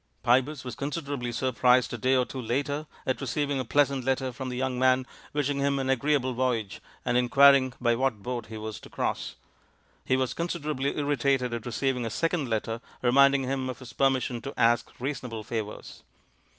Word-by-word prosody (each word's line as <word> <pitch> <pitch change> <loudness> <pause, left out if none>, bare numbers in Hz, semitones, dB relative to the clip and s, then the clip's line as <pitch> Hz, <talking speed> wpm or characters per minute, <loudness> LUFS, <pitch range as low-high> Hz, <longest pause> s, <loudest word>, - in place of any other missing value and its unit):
Pybus 130 +3 +2
was 125 - -6
considerably 140 -4 -3
surprised 125 0 +2
a - - -2
day 130 +4 +3
or 125 -1 +3
two 130 - -6
later 140 +5 -2 0.2
at 130 - -1
receiving 140 +1 -1
a - - -1
pleasant 140 +1 +2
letter 130 0 0
from 130 +1 -6
the 125 - -4
young 130 -1 -1
man 130 0 +3 0.3
wishing 145 -1 -1
him 140 0 +1
an 135 -1 0
agreeable 135 0 +1
voyage 120 -5 -1 0.2
and 120 0 +2
in 125 -1 +1
quiring 140 -2 +6
by 120 -1 +2
what 115 -4 -1
boat 120 -2 -4
he 110 0 -7
was 110 0 -6
to - - -13
cross; - - -3 0.7
he 130 - +1
was 130 -3 0
considerably 150 -5 -2
irritated 140 -3 +1
at 120 0 -4
receiving 125 +1 -1
a 115 - -2
second 160 +3 -1
letter 115 +1 -2 0.2
reminding 140 +2 +5
him 130 0 -2
of 125 - -5
his 130 -2 -11
permission 130 -3 +1
to 140 - -7
ask 120 0 +3
reasonable 125 -4 -4
favours. 110 -1 -6
130 Hz, 185 wpm, -27 LUFS, 120-140 Hz, 0.7 s, quiring